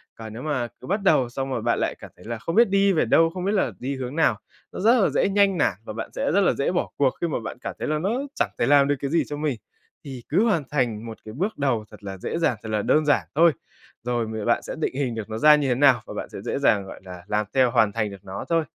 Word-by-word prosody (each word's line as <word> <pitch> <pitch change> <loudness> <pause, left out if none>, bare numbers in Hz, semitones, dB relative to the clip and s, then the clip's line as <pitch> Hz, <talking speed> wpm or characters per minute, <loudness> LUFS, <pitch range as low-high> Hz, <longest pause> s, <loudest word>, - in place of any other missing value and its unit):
Còn 110 -1 -9
nếu 115 - -7
mà 130 -5 -1
cứ 125 - -10
bắt 200 +3 0
đầu 130 -10 +3
xong 135 +2 -4
rồi 120 -4 -2
bạn 120 +1 +1
lại - - -1
cảm - - -11
thấy 90 - -17
là 115 0 -4
không 165 +10 -4
biết 235 -2 +5
đi 195 0 +3
về 160 - +2
đâu, 165 0 +4
không 180 +2 -5
biết 200 - +1
là 190 - +1
đi 135 +2 -3
hướng 130 +1 -5
nào, 160 - +2 0.3
nó - - -7
rất 230 +5 +4
là - - +3
dễ - - +1
nhanh 200 -1 +3
nản 125 - +2
và 110 - -7
bạn 115 - -6
sẽ - - 0
rất 200 +5 +3
là 190 - +3
dễ 140 - -1
bỏ 180 - -1
cuộc 135 -2 +3
khi 170 - +1
mà 150 - -2
bạn 110 - -6
cảm - - -5
thấy - - -3
là 155 0 0
nó 190 +5 -1 0.3
chẳng - - 0
thể - - +2
làm 140 0 +5
được 145 - +2
cái 140 +1 -3
gì 170 - +3
cho 145 - -5
mình. 145 -6 -2 0.5
Thì 130 -4 -8
cứ 185 +8 +3
hoàn 185 -9 +1
thành 120 -6 -1
một 115 -1 -8
cái 110 - -8
bước 195 - -2
đầu 130 -7 0
thật 105 -1 -14
là 95 -1 -6
dễ 95 - -4
dàng, 125 -8 +1
thật 110 - -6
là 105 -1 0
đơn 155 +8 +2
giản 145 - +2
thôi, 170 +1 +6 0.5
rồi 120 -1 -1
mười 110 -1 -5
bạn 120 - +2
sẽ - - -6
định 145 - -2
hình 130 -4 -1
được 110 -1 -6
nó 110 - -4
ra 150 +4 +7
như 145 -2 0
thế 125 - +2
nào 130 -3 +4
và - - -8
bạn - - -5
sẽ - - -8
dễ - - -3
dàng, 100 -2 +2
gọi - - -10
là, 90 -2 -10
làm 105 0 0
theo 130 -3 +3
hoàn 110 -4 +3
thành 110 -2 -1
được 100 0 -12
nó 95 0 -6
thôi. 165 -1 +2
135 Hz, 305 wpm, -24 LUFS, 110-165 Hz, 0.5 s, ra